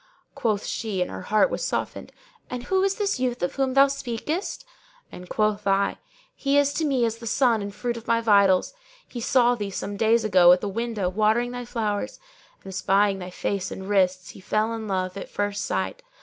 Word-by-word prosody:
Quoth 215 -4 -1
she 215 -5 -3
(and - - -7
her - - -6
heart 215 - +2
was - - -3
softened), - - -3 0.4
'And 250 -1 -5
who 380 +7 +1
is 390 0 +1
this 400 -9 -1
youth 250 -3 -1
of 175 - -1
whom 270 -1 -1
thou 275 0 +8
speakest?'; 275 - -4 0.5
and 180 0 -11
quoth 210 -1 0
I, 195 0 +1 0.4
'He 280 0 +1
is 285 0 +3
to 320 - -1
me 265 -5 +2
as 230 0 -3
a 230 - -6
son 235 -2 +2
and 200 - -4
the - - -19
fruit 240 0 -3
of 230 - -11
my 230 - +3
vitals. 200 - +4 0.3
He 240 - -7
saw 245 0 +3
thee, 205 -4 -4
some 200 +1 -5
days 225 +2 +3
ago, 185 -4 +6
at 180 - +1
the 205 - -2
window 220 -1 -2
watering 215 +5 +1
thy 245 0 -6
flowers 220 -1 -3 0.4
and 195 - -8
espying 195 +2 +2
thy 180 0 -6
face 190 +1 -3
and 190 - -7
wrists 185 -3 +1
he - - -13
fell 215 +4 0
in 225 -1 -5
love 185 -1 -2
at - - -7
first 205 0 -2
sight. - - -2
220 Hz, 210 wpm, -25 LUFS, 200-245 Hz, 0.5 s, thou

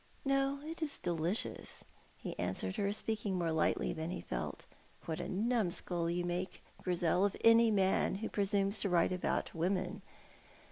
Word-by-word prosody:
"No, 275 +1 +1
it 325 +1 -6
is 300 -3 -1
delicious," 170 +4 -1 0.3
he - - -5
answered 95 +1 -2
her, 200 0 +1
speaking 210 -2 -2
more 170 -2 0
lightly 160 -1 +1
than 160 0 -4
he 180 - -3
felt. - - -4 0.4
"What 160 -1 -3
a - - -4
numskull 185 -5 0
you 175 +1 0
make, 175 +2 -3 0.2
Grizel, 180 0 +2
of 200 -1 +1
any 230 0 +7
man 195 -3 +2
who 220 +3 -3
presumes 200 0 +1
to 200 - 0
write 175 +1 +3
about 180 - -1
women! 180 +2 -1
185 Hz, 155 wpm, -34 LUFS, 170-215 Hz, 0.4 s, any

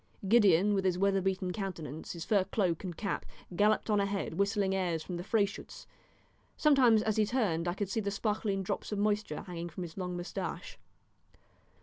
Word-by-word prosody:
Gideon, 205 -3 +5
with 195 -1 +1
his 185 -2 +1
weather 195 0 +2
beaten 185 -1 -1
countenance, 165 -7 -5
his 170 -2 -6
fur 205 -4 +3
cloak 185 -4 0
and 180 -3 -5
cap, 200 - -2 0.3
galloped 210 +3 +3
on 210 -2 +2
ahead, 200 -3 -1
whistling 200 +1 +1
airs 175 -4 -1
from 180 - -5
the 175 - -5
Freyschütz; 205 0 -2 0.7
sometimes 255 -7 +5
as 220 -1 0
he 215 - +4
turned 190 -9 0
I 175 - -1
could 205 0 -2
see 200 - -1
the 200 -2 -1
sparkling 205 -1 -1
drops 185 - -4
of 210 - -1
moisture 205 -5 0
hanging 175 -1 -6
from 180 +2 -6
his 165 0 -9
long 180 -1 -3
moustache. - - -5
195 Hz, 185 wpm, -31 LUFS, 180-210 Hz, 0.7 s, Gideon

